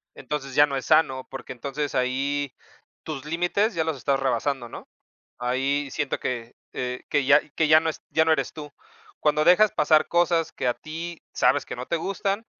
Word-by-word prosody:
entonces 135 -3 -5
ya 145 - +7
no 140 - -4
es 130 - -5
sano, 135 -5 +2
porque 135 -1 -7
entonces, 140 +4 -4
ahí 135 +2 -1 0.5
tus 150 -3 -6
límites 175 +7 0
ya 160 - +1
los 160 -3 -2
estás 135 +1 0
rebasando, 135 -2 -1
¿no?, - - -10 0.5
ahí 135 +3 0
siento 150 -3 -2
que, 120 -2 -4 0.2
eh, 125 0 -4
que 145 -2 +1
ya 145 +2 +6
que 155 +1 0
ya 155 0 +7
no 160 - -2
es - - -10
ya 160 - +3
no 160 - +3
eres 140 -4 0
tú. 150 -2 -9 0.5
Cuando 150 0 +2
dejas 200 +5 +6
pasar 155 -1 +3
cosas 170 -1 +1
que 125 - -2
a 120 - +1
ti 165 +2 -7
sabes - - +2
que - - -5
no 125 - -6
te 170 - 0
gustan, 200 +5 -2
150 Hz, 195 wpm, -25 LUFS, 135-160 Hz, 0.5 s, ya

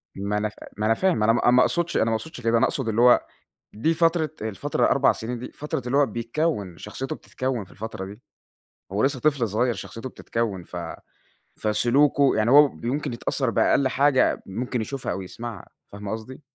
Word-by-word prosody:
ما 100 +1 -2
أنا 105 0 0
ف - - -20 0.2
ما 105 - -1
أنا 115 - +4
فاهم 180 - +1
أنا 115 +1 +5
ما 120 - +1
أ - - +6
ما 125 0 +6
أقصدش 170 -1 +1
أنا - - +3
ما 115 - 0
أقصدش 130 +1 -6
كده، 115 0 +2
أنا - - +4
أقصد 130 -5 -2
اللي 110 +2 +1
هو 125 0 +6 0.5
دي 155 +10 +1
فترة 165 -1 +2
الفترة 110 -4 0
4 - - +4
سنين 120 +2 -5
دي 125 - -8
فترة 150 -2 -4
اللي 125 +3 0
هو 145 -1 +5
بيتكوّن، 115 - -2
شخصيته 130 +6 -5
بتتكوّن 130 -5 -3
في - - -22
الفترة 110 -2 -6
دي، 100 +2 -10 0.7
هو 100 - 0
لسه 135 -1 0
طفل 140 -6 +2
صغيّر 120 +4 +1
شخصيته 115 +3 -7
بتتكوّن 115 -7 -3
ف 90 - -10 0.8
فسلوكُه 135 +6 +3
يعني 110 +2 +2
هو 145 +2 +8
ب - - -14
يمكن 140 +3 -1
يتأثّر 115 - -1
بأقل 140 - +3
حاجة 135 0 +2
ممكن 120 +5 -3
يشوفها 135 +4 -3
أو 95 - -4
يسمعها، 110 +2 -8 0.2
فاهمة 100 0 -6
قصدي؟ 110 +5 -7
120 Hz, 200 wpm, -24 LUFS, 110-140 Hz, 0.8 s, هو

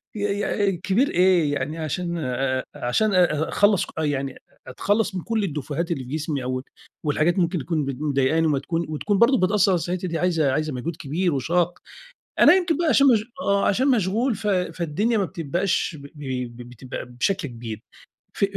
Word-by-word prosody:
ي 205 - -4 0.5
ي 190 - -2
كبير 200 +10 +1
إيه 180 -5 +3
يعني 145 +3 -3
عشان 170 +2 -3
آآ، 130 -3 -1
عشان 205 - 0
أ 165 -4 +2
أخلّص 205 -3 +3
ك - - -13
يعني 140 -3 -1 0.3
أتخلّص 205 - 0
من 180 - -2
كُلّ 225 +1 -1
الديفوهات 155 0 -3
اللي 135 -6 -2
في 125 - -11
جسمي 150 -3 -2
أو 130 +1 -2
ال - - -10 0.4
والحاجات 155 +5 +2
ممكن 170 0 +1
تكون 155 0 -1
بت 135 -2 -4
مضايقاني 150 +2 +2
وما 145 -3 +1
تكون 165 +4 -2
وتكون 195 +6 -1
برضو 260 +3 +5
بتأثر 195 0 +3
على 180 - +3
صحتي 180 +2 -3
دي 165 -2 -2
عايزة 165 -6 +2
عايزة 155 +1 -1
مجهود 150 +7 -4
كبير 165 +4 -1
وشاق، 170 +6 0 0.6
أنا - - +8
يمكن 355 -5 +1
بقى 335 -3 +2
شغ 280 - +5 0.4
آه 200 -3 +2
عشان 255 +7 +2
مشغول 230 +1 +2
ف 210 - -7
فالدنيا 180 +3 0
ما 200 - +1
بتبقاش 170 +1 -1
ب 140 - -10
ب 125 -4 -5
ب 120 0 -10
بتبقى 125 +2 -7
بشكل 145 +8 -1
كبير، 115 -3 -7 0.5
ف - - -2
165 Hz, 185 wpm, -23 LUFS, 140-190 Hz, 0.6 s, أنا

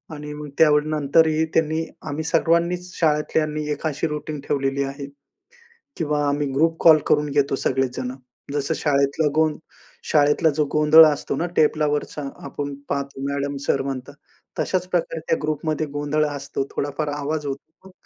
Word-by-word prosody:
आणि 150 0 -7
मग 150 0 -7
त्यावेळी 150 -1 +4
नंतरही 155 +1 +3
त्यांनी 160 0 +1 0.2
आम्ही 150 +2 -3
सर्वांनीच 170 +2 +1
शाळेतल्यांनी 155 -1 +1
एक 150 - -4
अशी 150 +2 -1
रुटीन 150 0 -5
ठेवलेली 140 -1 0
आहे, 140 +1 -5 0.9
किंवा 150 -3 0
आम्ही 145 0 0
ग्रुप 165 +3 +2
कॉल 160 -2 +8
करून 150 0 +2
घेतो, 140 -1 +1
सगळेच 130 -1 -1
जणं. 125 0 -4 0.4
जसं 145 +2 -1
शाळेतला 140 +1 +1
गों 155 -1 +3 0.6
शाळेतला 150 +2 +4
जो 150 0 +2
गोंधळ 155 +1 +8
असतो 150 -2 0
ना, 165 - -1
टेबलावरचा 150 -1 +1 0.2
आपण 145 0 -5 0.2
पाहतो, 140 -1 -3
मॅडम, 140 0 -2
सर 135 - +2
म्हणतात, 135 +1 -5 0.4
तशाच 185 -1 0
प्रकारे 170 -2 -1
त्या 165 - +2
ग्रुपमध्ये 155 +1 -1
गोंधळ 145 +1 0
असतो, 140 -1 -4
थोडाफार 145 +2 -2
आवाज 145 +1 -3
होतो. 160 +7 -8
150 Hz, 145 wpm, -22 LUFS, 140-155 Hz, 0.9 s, कॉल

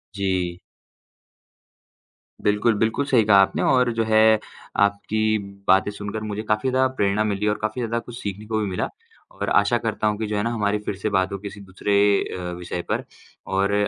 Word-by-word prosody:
जी। 95 -3 -1 1.8
बिल्कुल, 105 +3 +3
बिल्कुल 110 +6 +1
सही 125 -5 +4
कहा 100 -2 +6
आपने 95 - +1
और 125 -2 +3
जो 115 0 0
है 110 0 +5 0.4
आपकी 110 +2 +1 0.3
बातें 95 +2 +4
सुनकर 105 +1 -5
मुझे 105 0 -4
काफ़ी 105 +4 0
ज़्यादा 130 0 +3
प्रेरणा 100 +1 +2
मिली 105 -1 -1
और 105 - +1
काफ़ी 110 +4 -2
ज़्यादा 115 0 -1
कुछ 120 +1 -10
सीखने 100 +1 -5
को 110 0 -1
भी 105 - 0
मिला। 90 - -2 0.4
और - - -4
आशा - - +3
करता 110 - -1
हूँ 105 0 0
कि 110 0 -3
जो 105 - -2
है 105 - 0
ना 115 - 0
हमारी 105 -2 0
फिर - - -2
से 105 +2 -2
बात 95 -1 +1
हो 100 - -3
किसी 100 +1 -8
दूसरे 95 +1 -3 0.4
अ, 90 -1 -5
विषय 90 0 -4
पर। - - 0 0.4
और 100 +1 +1
105 Hz, 190 wpm, -23 LUFS, 100-110 Hz, 1.8 s, कहा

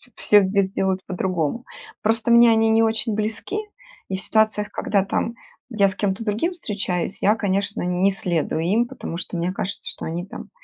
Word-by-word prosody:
все 205 -1 +5
здесь 195 0 +1
делают 190 -1 0
по-другому. 185 - -2 0.4
Просто 225 +2 +1
мне 235 0 +7
они 225 0 +3
не 225 +1 +4
очень 225 0 0
близки 220 - -2 0.5
и 190 - -2
в 190 - -5
ситуациях, 215 -1 +2
когда 200 -2 0
там 225 +3 -1 0.4
я 205 -5 +3
с 190 - -4
кем-то 205 +2 -2
другим 220 - 0
встречаюсь, 200 - -3
я, 210 +2 +4
конечно, 200 -1 -1
не 180 +2 +2
следую 170 -4 -1
им, 215 +8 +2
потому 170 - -6
что 175 -1 -4
мне 175 +2 -1
кажется, 195 +1 -4
что - - -5
они 170 +2 -4
там 195 - -9
200 Hz, 180 wpm, -22 LUFS, 185-220 Hz, 0.5 s, мне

